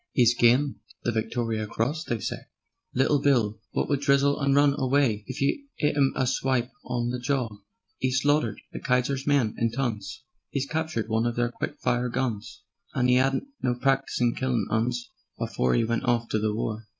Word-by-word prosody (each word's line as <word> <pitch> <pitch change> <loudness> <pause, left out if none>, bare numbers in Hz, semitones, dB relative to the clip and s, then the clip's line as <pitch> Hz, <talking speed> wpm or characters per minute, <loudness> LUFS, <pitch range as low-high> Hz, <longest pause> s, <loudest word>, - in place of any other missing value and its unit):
'E's 120 -2 +5
gyned 125 +4 +3 0.3
the 120 - +1
Victoriar 110 -1 -2
Cross, 140 +10 -2
they 120 - -2
say; - - -5 0.5
Little 135 +2 +3
Bill 115 -7 +2 0.2
wot - - +1
would 140 -1 0
grizzle 140 0 +3
and 140 -1 +2
run 145 0 +5
away, 130 -5 +2
If 130 - -6
you 280 - 0
'it 150 -1 +1
'im 140 -2 +3
a 130 - +1
swipe 130 -1 0
on 120 -1 -2
the 125 - -3
jawr. 125 -4 -1 0.5
'E's 130 0 +2
slaughtered 145 +2 +1
the - - -5
Kaiser's 130 +2 0
men 140 -7 +3
in 115 - +2
tons; 115 -4 -3 0.3
'E's 140 -1 0
captured 160 -7 -2
one 110 +1 +1
of 120 - -2
their 120 0 0
quick - - -5
fire 125 0 +1
guns, 120 -4 -3 0.3
And 125 0 +3
'e 125 - +5
'adn't 135 +1 +1 0.2
no 125 -1 +1
practice 135 +2 0
in 120 -1 +3
killin' 125 -5 0
'Uns 120 +2 -1 0.3
Afore 65 0 0
'e - - +3
went 115 +3 -1
off 120 -1 +1
to 110 - +1
the 110 0 0
war. 110 -1 -3
125 Hz, 190 wpm, -26 LUFS, 115-135 Hz, 0.5 s, E's